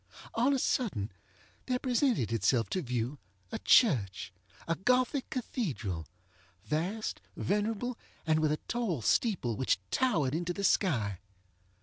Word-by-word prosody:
On 245 +4 +3
a 275 - +3
sudden, 185 - 0 0.6
there 250 -1 +1
presented 245 - +1
itself 115 +2 +2
to 185 - 0
view 125 +1 -2 0.3
a - - -3
churchŌĆöa 100 - +1
Gothic 250 +3 +2
cathedralŌĆövast, 100 - -4 0.2
venerable, 220 +4 -1 0.3
and 155 -1 +3
with 155 -1 +2
a 155 - +1
tall 215 - -1
steeple, 160 - +2
which 130 -1 +2
towered 160 - +2
into 175 +2 -1
the 200 - -4
sky. 115 - +2
160 Hz, 115 wpm, -31 LUFS, -, 0.6 s, On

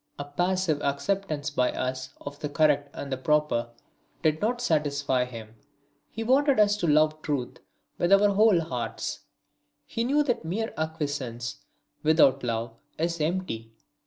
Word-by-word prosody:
A 145 - -5
passive 175 0 0
acceptance 150 0 -1
by 125 -3 +1
us 130 0 -3
of 145 0 -8
the 150 - -3
correct 145 -1 +2
and 140 - -6
the 130 - -1
proper 150 -4 +1 0.5
did 155 0 +2
not 240 +3 0
satisfy 140 - +1
him; 115 -3 -9 0.6
he 225 - -5
wanted 270 +2 +3
us 205 -1 +5
to 175 - -1
love 155 +1 +3
truth 140 -6 -3 0.4
with 175 - +1
our 200 +1 +6
whole 200 -3 +4
hearts; 165 0 -4 0.7
he 230 - -2
knew 285 +5 +3
that 245 - -1
mere 205 +8 -3
acquiescence 145 -7 -3 0.4
without 155 -3 +4
love 115 -1 -2 0.2
is 170 0 -1
empty. 150 -10 -2
155 Hz, 145 wpm, -27 LUFS, 140-190 Hz, 0.7 s, our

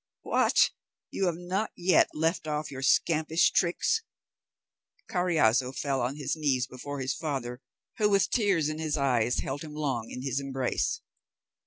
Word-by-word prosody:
What, - - +3 0.4
you 195 - 0
have 170 -2 -1
not 185 +5 -2
yet 180 +1 +4
left 160 +1 0
off 150 0 -2
your 135 -1 -6
scampish 155 +4 +3
tricks?" 180 - +1 1.1
Carriazo 145 - +2
fell 135 -1 -1
on 125 +3 -1
his 145 0 -2
knees 140 -5 +1
before 135 +2 -7
his 130 0 -1
father, 130 -5 -4 0.4
who, 210 -2 +3
with 200 -1 +2
tears 195 - +2
in 155 0 -3
his 155 -1 -1
eyes, 125 -4 +1
held 140 +2 -4
him 150 -2 -8
long 135 -7 -2
in 125 - -7
his 135 -1 -1
embrace. 135 - -1
150 Hz, 155 wpm, -28 LUFS, 130-170 Hz, 1.1 s, yet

